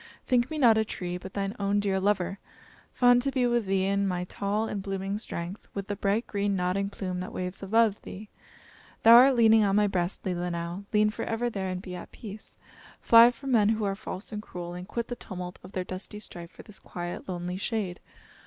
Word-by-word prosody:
think 245 Hz, 0 st, +2 dB
me 315 Hz, -, -4 dB
not 235 Hz, -6 st, +5 dB
a -, -, +3 dB
tree; 180 Hz, -4 st, -5 dB
but 185 Hz, +2 st, -8 dB
thine 200 Hz, +1 st, -2 dB
own 200 Hz, 0 st, +1 dB
dear 195 Hz, -2 st, 0 dB
lover; 195 Hz, -1 st, 0 dB, 0.5 s
fond 245 Hz, -1 st, +5 dB
to 275 Hz, -, 0 dB
be 260 Hz, -2 st, +1 dB
with 240 Hz, -3 st, +1 dB
thee 190 Hz, 0 st, +1 dB
in 200 Hz, 0 st, +1 dB
my 180 Hz, -1 st, -1 dB
tall 205 Hz, +4 st, -2 dB
and 205 Hz, -, -3 dB
blooming 195 Hz, 0 st, -3 dB
strength, 175 Hz, -1 st, -6 dB
with 200 Hz, -1 st, -3 dB
the 205 Hz, -, -3 dB
bright 205 Hz, +3 st, 0 dB
green 200 Hz, -1 st, -1 dB
nodding 185 Hz, +2 st, 0 dB
plume 185 Hz, -3 st, -4 dB
that 185 Hz, -, -5 dB
waves 180 Hz, +1 st, -4 dB
above 215 Hz, +1 st, +2 dB
thee. 210 Hz, +3 st, -9 dB, 0.8 s
Thou 230 Hz, -, +9 dB
art 255 Hz, +3 st, +8 dB
leaning 225 Hz, -2 st, +6 dB
on 200 Hz, -1 st, +2 dB
my 210 Hz, 0 st, +4 dB
breast, 185 Hz, -2 st, -1 dB
Leelinau; 175 Hz, +1 st, -3 dB
lean 210 Hz, 0 st, +3 dB
forever 225 Hz, +3 st, -2 dB
there 190 Hz, -3 st, -3 dB
and 185 Hz, 0 st, -4 dB
be 185 Hz, -, -7 dB
at 180 Hz, -, -8 dB
peace. 210 Hz, -1 st, -9 dB, 0.4 s
Fly 230 Hz, +1 st, +8 dB
from 265 Hz, +3 st, -6 dB
men 215 Hz, -4 st, +4 dB
who 220 Hz, -1 st, 0 dB
are 200 Hz, -1 st, 0 dB
false 195 Hz, +1 st, -7 dB
and 210 Hz, -1 st, -4 dB
cruel, 175 Hz, -4 st, -7 dB
and 180 Hz, +1 st, -7 dB
quit 235 Hz, -1 st, -3 dB
the 245 Hz, -, -4 dB
tumult 180 Hz, -5 st, -7 dB
of 185 Hz, -, -12 dB
their 185 Hz, -, -2 dB
dusty 185 Hz, +3 st, -7 dB
strife 175 Hz, -5 st, -9 dB
for -, -, -14 dB
this 210 Hz, -, -11 dB
quiet, 175 Hz, +1 st, -6 dB
lonely 180 Hz, 0 st, -3 dB
shade. 200 Hz, -3 st, -2 dB
200 Hz, 215 wpm, -28 LUFS, 185-220 Hz, 0.8 s, Thou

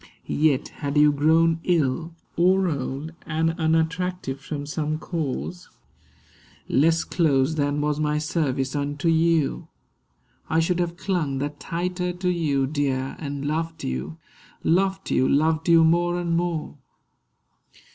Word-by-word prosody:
Yet 150 Hz, -3 st, +1 dB
had 145 Hz, 0 st, -4 dB
you 150 Hz, 0 st, +6 dB
grown 160 Hz, +3 st, +3 dB
ill, 165 Hz, -1 st, 0 dB, 0.2 s
Or 185 Hz, +2 st, +3 dB
old, 140 Hz, 0 st, -3 dB, 0.2 s
and 160 Hz, +1 st, +1 dB
unattractive 160 Hz, -2 st, 0 dB
from 145 Hz, 0 st, -5 dB
some 150 Hz, +1 st, -2 dB
cause 165 Hz, +2 st, -4 dB, 1.0 s
(Less 160 Hz, +5 st, +3 dB
close 145 Hz, -4 st, +2 dB
than 145 Hz, -1 st, 0 dB
was 150 Hz, 0 st, 0 dB
my 150 Hz, 0 st, +1 dB
service 150 Hz, -4 st, -1 dB
unto 145 Hz, +3 st, -1 dB
you), 165 Hz, -2 st, +2 dB, 0.8 s
I 160 Hz, 0 st, +2 dB
should 170 Hz, +2 st, +1 dB
have 175 Hz, -1 st, -1 dB
clung 175 Hz, -8 st, -1 dB
the 145 Hz, +2 st, -1 dB
tighter 180 Hz, +4 st, -3 dB
to 180 Hz, +1 st, -2 dB
you, 145 Hz, -6 st, +1 dB
dear; 135 Hz, -2 st, -1 dB
And 140 Hz, -2 st, -5 dB
loved 160 Hz, +2 st, -2 dB
you, 65 Hz, +5 st, -4 dB, 0.5 s
loved 190 Hz, +3 st, +1 dB
you, 130 Hz, -, +3 dB
loved 160 Hz, +3 st, +2 dB
you 165 Hz, -1 st, +7 dB
more 175 Hz, +2 st, +2 dB
and 170 Hz, -1 st, -1 dB
more. 165 Hz, -4 st, -2 dB
160 Hz, 130 wpm, -24 LUFS, 145-170 Hz, 1.0 s, you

